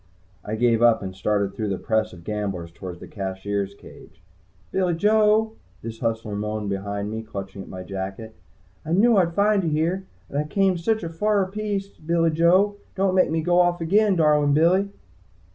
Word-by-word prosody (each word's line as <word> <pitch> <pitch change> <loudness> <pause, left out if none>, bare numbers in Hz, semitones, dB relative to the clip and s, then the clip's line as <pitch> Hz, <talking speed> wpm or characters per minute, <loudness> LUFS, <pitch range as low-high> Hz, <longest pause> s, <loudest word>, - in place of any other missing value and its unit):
I 105 - -3
gave 115 0 +2
up 120 -3 +4
and 95 -1 -6
started 100 0 0
through 105 +1 -3
the 95 - -1
press 110 +1 0
of 85 -1 -13
gamblers 100 -4 -4
toward 90 0 -8
the - - -10
Cashier's 100 0 -4
cage. - - -15 0.5
"Billy 180 -3 +1
Joe!" 215 +3 +3 0.3
this 115 0 -7
hustler 115 -3 -2
moaned 105 0 -3
behind 100 +1 -3
me, 110 0 -4
clawing 100 -3 -7
at - - -10
my 90 0 -7
jacket. 100 +3 -6 0.5
"I 160 - -3
knew 220 +4 +5
I'd 170 -3 +2
find 205 -1 +3
you 165 - 0
here. 170 +5 -1 0.2
And 140 - -3
I 150 - -1
came 190 +3 +2
sich 215 +5 0
a 165 - -3
fer 200 +4 +1
piece, 205 -1 -3
Billy 165 -1 0
Joe! 185 +6 +3 0.2
Don't 195 -1 +1
make 185 -1 +3
me 160 0 -1
go 175 +1 +3
off 175 0 +3
again, 200 +4 +3
darlin' 150 -3 +3
Billy!" 185 +6 +3
150 Hz, 185 wpm, -24 LUFS, -, 0.5 s, knew